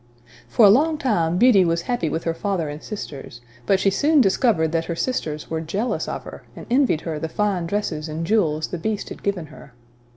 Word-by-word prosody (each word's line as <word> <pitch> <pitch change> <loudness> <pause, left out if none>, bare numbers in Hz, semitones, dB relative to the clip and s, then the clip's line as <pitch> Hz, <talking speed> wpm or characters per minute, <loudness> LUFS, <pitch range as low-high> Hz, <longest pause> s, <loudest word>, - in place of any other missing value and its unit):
For 230 - +5
a - - +8
long 305 +7 +3
time 175 - 0
Beauty 220 -3 +6
was 170 -1 0
happy 240 -9 -1
with 160 +2 -3
her 165 - -1
father 175 -3 -2
and 150 +1 -7
sisters; 140 - -8 0.3
but 195 - +3
she 195 0 +2
soon 295 +9 +3
discovered 195 - +2
that 165 0 0
her 170 - -3
sisters 160 -10 -3
were 160 -1 -1
jealous 195 +9 -2
of - - -5
her, - - -10
and - - -9
envied 250 - +3
her 160 -3 -4
the 160 +1 -4
fine 195 -3 -1
dresses 165 -5 -2
and 160 +2 -4
jewels 160 -7 +1
the 180 - -5
Beast 215 +3 -3
had - - -9
given 195 -5 -2
her. 145 -4 -15
175 Hz, 215 wpm, -22 LUFS, 160-215 Hz, 0.3 s, a